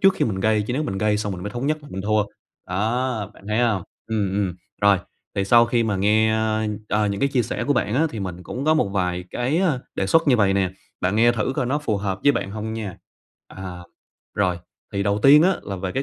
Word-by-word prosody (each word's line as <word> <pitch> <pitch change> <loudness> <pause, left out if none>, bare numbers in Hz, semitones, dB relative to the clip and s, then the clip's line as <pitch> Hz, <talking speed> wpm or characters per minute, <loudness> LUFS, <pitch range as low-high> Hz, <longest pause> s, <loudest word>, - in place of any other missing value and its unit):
trước 195 0 +5
khi - - +1
mình 95 -4 -2
gây, 110 +1 +2
chứ 115 - -4
nếu 140 +5 0
mình 95 -10 -3
gây 105 0 +2
xong 105 -1 -2
mình 90 -1 -6
mới 105 - -4
thống 120 +5 -3
nhất 155 +1 +1
là 145 - -12
mình 95 - -5
thua. 105 0 +2 0.4
Đó, 110 +2 -1
bạn - - -18
thấy 105 - 0
hông? 115 -6 +2 0.2
Ừm, 105 -4 -1
ừm. 95 -3 0 0.3
Rồi. 100 -2 +5 0.4
Thì 100 - 0
sau 115 +4 +6
khi 115 0 +1
mà 105 -3 0
nghe, 110 +3 +3
a, 110 0 0 0.2
ờ, 105 0 +2
những 100 -1 -2
cái 140 - +3
chia 130 -3 +1
sẻ 115 - -3
của 145 - +2
bạn 110 -5 0
á, 155 +5 +3
thì 110 - -6
mình 90 -2 -5
cũng 130 +8 -5
có 155 +1 +4
một 155 - +2
vài 90 -2 -1
cái, 130 +7 0
a, 175 -8 +2 0.2
đề 95 - -1
xuất 165 +7 +3
như 125 - +5
vậy 100 -2 +3
nè, 95 -2 +1 0.3
bạn 95 +3 0
nghe 120 +2 +5
thử 110 0 -1
coi 125 - 0
nó 140 +4 +1
phù 115 -8 -1
hợp 100 -1 -2
với 145 - +5
bạn 100 - -3
hông 110 +1 -4
nha. 105 -5 -5 0.5
À. 90 -2 -8 0.5
Rồi. 90 -4 +1 0.3
Thì 100 - 0
đầu 100 +1 +1
tiên 145 +3 +8
á 190 - +4
là 100 - -5
về 95 0 -4
cái 135 - -1
105 Hz, 260 wpm, -23 LUFS, 100-120 Hz, 0.5 s, tiên